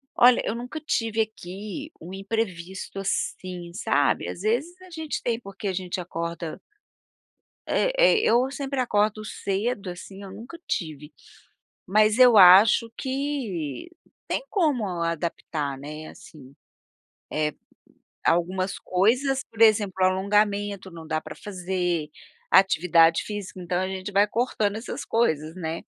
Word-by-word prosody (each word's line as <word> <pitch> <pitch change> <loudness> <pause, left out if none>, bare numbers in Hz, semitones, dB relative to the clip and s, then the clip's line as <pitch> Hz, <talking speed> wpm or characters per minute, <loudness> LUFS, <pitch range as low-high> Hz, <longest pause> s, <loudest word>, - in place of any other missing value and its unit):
Olha, 245 0 +6
eu 220 - -1
nunca 250 +6 -6
tive, 225 -7 0
aqui, 215 - -6
um 175 +3 -9
imprevisto, 195 -2 -4
assim, 180 -2 -3
sabe. 145 -5 +1
Às - - -6
vezes, 270 - -1
a 370 - -13
gente 320 -3 -4
tem 230 -1 -1
porque 200 -2 -7
a 190 - -1
gente 185 0 -3
acorda 170 -1 -5 1.1
Eh - - +2
eh, - - +5
eu 255 - +3
sempre 275 -1 -4
acordo 215 -3 +1
cedo, 200 +1 -2
assim, 190 +2 -9
eu 195 - -9
nunca 230 - -10
tive. 150 -3 -4 0.8
Mas, 215 +3 +4
eu 245 -3 +8
acho 200 +5 +8
que 260 - -3 0.4
tem - - -1
como 300 - +1 0.2
adaptar, 160 -4 -3
né, 155 +3 -8
assim. 140 -3 -14 0.8
Eh, 150 -1 0 0.7
algumas 185 +3 +1
coisas, 255 +9 +1
por 225 - -13
exemplo, 215 -3 +5
o - - +5
alongamento, 200 +1 +1
não 165 -2 -10
dá 155 0 -1
para 155 -1 -9
fazer. 180 -5 -2 0.4
Atividade 170 -3 +5
física, 205 -3 -6
então, 175 0 -1
a 185 - -1
gente 190 +1 -5
vai 200 +1 +4
cortando 215 -2 0
essas 225 - -6
coisas, 160 -9 0
né. 165 -2 -4
195 Hz, 135 wpm, -25 LUFS, 175-230 Hz, 1.1 s, eu